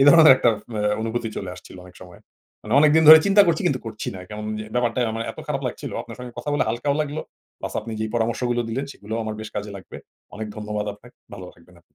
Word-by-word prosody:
এই - - +6
ধরনের 155 -2 +9
একটা 125 - +2 0.3
এ - - -1 0.2
অনুভূতি 115 +1 -2
চলে 95 - -4
আসছিল 90 - -13
অনেক 90 - -15
সময়। 90 -1 -13 0.4
মানে, - - -6
অনেক 150 0 +6
দিন 160 - +5
ধরে 160 0 +13
চিন্তা 200 +1 +6
করছি, 170 0 +1
কিন্তু 135 -6 0
করছি 110 -1 -5
না। 95 - -8
কেমন 105 0 -7
জে 110 - -5
ব্যাপারটা 125 0 0
আমার 115 - -3
এত - - -15
খারাপ - - -2
লাগছিল, - - -5
আপনার 115 - -11
সঙ্গে 125 -1 -8
কথা - - -6
বলে 145 - +2
হাল্কাও 120 +5 0
লাগলো 150 0 -3 0.4
প্লাস, - - -6
আপনি 115 +1 -8
যেই 110 0 -2
পরামর্শগুলো 120 +1 0
দিলেন, 130 +5 -2
সেগুলোও 110 +2 -6
আমার 110 - -4
বেশ 110 - -6
কাজে 105 0 -4
লাগবে। 95 - -11 0.4
অনেক 110 +1 -5
ধন্যবাদ 105 0 -4
আপনাকে। 120 +4 -19 0.2
ভালো 95 -2 -9
থাকবেন 90 +1 -21
আপনি। - - -32
115 Hz, 235 wpm, -23 LUFS, 105-130 Hz, 0.4 s, ধরে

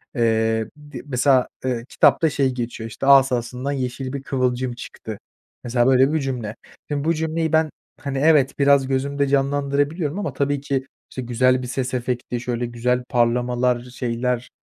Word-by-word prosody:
eee, 110 -1 +1 0.2
di 140 - -7
mesela, 130 -1 +3 0.2
eee, 120 -2 -2
kitapta 160 +2 +4
şey 140 -2 +1
geçiyor, 120 -2 -5
işte, 115 - -5
asasından 130 -1 +3
yeşil 130 -1 -3
bir 140 -1 -5
kıvılcım 130 -2 -1
çıktı. 110 -3 -8 0.4
Mesela, 120 0 +1
böyle 130 +2 +4
bir 160 - +2
cümle, 125 -6 -4 0.3
şimdi 145 -1 -1
bu 165 +2 +2
cümleyi 160 0 -1
ben, 160 0 +3 0.3
hani, 140 -1 -3
evet, 145 -2 +3
biraz 140 -1 +4
gözümde 140 +1 0
canlandırabiliyorum 145 +4 0
ama 155 -10 -3
tabii 140 +1 -1
ki, 135 -2 -2 0.3
işte, 130 - -5
güzel 125 +1 +2
bir 125 - -5
ses 125 +1 -3
efekti, 125 -1 -2
şöyle, 120 0 -2
güzel 125 +1 -1
parlamalar, 120 0 +1
şeyler, 125 0 -3
130 Hz, 155 wpm, -22 LUFS, 120-140 Hz, 0.4 s, kitapta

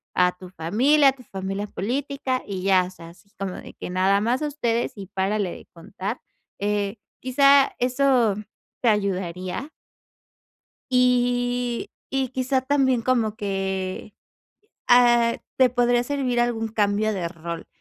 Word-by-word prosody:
a 180 0 +3
tu 185 -1 -11
familia, 255 - +3
a - - +2
tu 255 -2 -16
familia 195 +1 -4
política, 260 +5 -2
y 190 -2 -5
ya. 190 -1 +4
O - - -7
sea, 165 -2 -12
así 195 +4 -19
como 195 -2 -3
de - - -10
que, - - -8
nada 190 +2 +2
más 240 +5 0
a 300 - 0
ustedes, 240 -5 -1
y 195 -2 -7
párale 195 0 -1
de - - -13
contar. 190 +6 -6 0.4
Eh, 205 +1 -1 0.2
quizá, 275 +2 +5
eso, 250 -4 +2 0.5
¿te 245 - +1
ayudaría? 190 - -2 1.2
Y, 245 -1 +1 0.2
y 270 -1 0
quizá 260 +1 0
también 260 -2 +2
como 230 -3 +1
que 195 -1 -3 0.8
ah, 240 -1 +5 0.2
te 255 -2 +5
podría 245 0 +2
servir 260 -2 -1
algún 235 -2 0
cambio 210 0 +1
de 175 -3 -2
rol. 170 -1 -7
225 Hz, 140 wpm, -24 LUFS, 195-255 Hz, 1.2 s, quizá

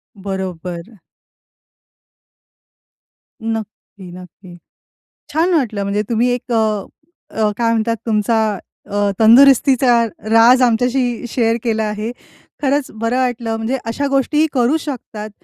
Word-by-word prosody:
बरोबर. 190 0 -6 2.5
नक्की, 215 -4 -6
नक्की. 180 0 -13 0.8
छान 335 +4 +1
वाटलं 225 -10 0
म्हणजे 200 +1 -1
तुम्ही 235 +1 +1
एक 245 0 -3
अ, - - +2 0.7
अ, 215 -1 0
काय 230 -1 +1
म्हणतात 230 0 0
तुमचा 220 0 +1 0.5
अ, 205 0 0
तंदुरुस्तीचा 250 +1 +5 0.3
राज 235 +3 +6
आमच्याशी 245 0 +1
शेअर 230 -1 +1
केला 220 -2 0
आहे. 210 +1 -3 0.5
खरंच 280 0 0
बरं 230 +2 0
वाटलं. 240 -3 -2
म्हणजे 225 +4 -2
अशा 230 +5 -2
गोष्टीही 295 +3 +2
करू 255 +3 +2
शकतात. 230 -7 -7
230 Hz, 110 wpm, -17 LUFS, 210-250 Hz, 2.5 s, राज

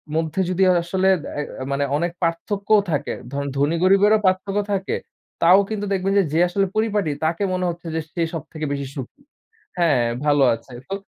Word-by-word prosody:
মধ্যে 160 +3 0
যদি 185 +1 +1 0.2
আসলে 190 +2 0 0.2
অ্যা 150 - -5 0.2
অ্যা 130 - -5
মানে 140 +1 0
অনেক 170 +2 -1
পার্থক্যও 200 +5 +1
থাকে। 145 - -1 0.2
ধরেন 140 0 -3
ধনী 145 +4 +2
গরিবেরও 205 +3 +5
পার্থক্য 190 +2 +1 0.2
থাকে 190 0 -1 0.5
তাও 180 +4 +7
কিন্তু 205 -1 -3
দেখবেন 195 +1 0
যে, 195 - +5
যে 165 - +2
আসলে 195 +2 +1
পরিপাটি 210 -7 +1
তাকে 170 +5 0
মনে 180 0 -1
হচ্ছে 170 0 -7
যে 160 - 0
সে 170 - 0
সবথেকে 155 -1 -5
বেশি 140 -1 -3
সুখী 135 - -8 0.6
হ্যাঁ, 150 -8 +3 0.2
ভালো 145 -2 +4
আছে। 115 +3 -9 0.2
তো - - -3
175 Hz, 180 wpm, -22 LUFS, 150-195 Hz, 0.6 s, তাও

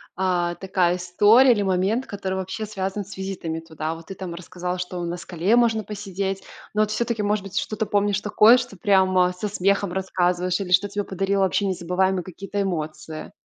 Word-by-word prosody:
а, 175 -2 0
такая 185 -2 +1
история 205 +8 +5
или 215 -4 +2
момент, 195 +6 +1
который 195 -2 -4
вообще 190 +3 -4
связан 200 -1 -3
с 195 - -11
визитами 190 -4 -4
туда? 160 -1 -5
Вот 165 0 -13
ты 195 - -7
там 185 -3 -6
рассказал, 180 +1 -5
что 180 0 -4
на 170 +1 -3
скале 175 +4 0
можно 230 -2 +3
посидеть, 195 -2 -4 0.3
но 215 - +2
вот, 215 - +1
всё-таки, 230 -1 -1
может 205 -1 0
быть, 195 -1 -7
что-то 220 0 -2
помнишь 205 -1 +1
такое, 215 +3 +6
что 245 -5 -5
прямо 185 -2 +3
со 180 +4 -4
смехом 200 -1 +1
рассказываешь, 180 -1 0
или 190 -2 -4
что 185 +3 +4
тебе 205 +1 -2
подарило 195 +1 -1
вообще 190 +1 +2
незабываемые 185 +1 0
какие-то 195 +3 -5
эмоции? 155 -4 -4
190 Hz, 185 wpm, -23 LUFS, 180-205 Hz, 0.3 s, такое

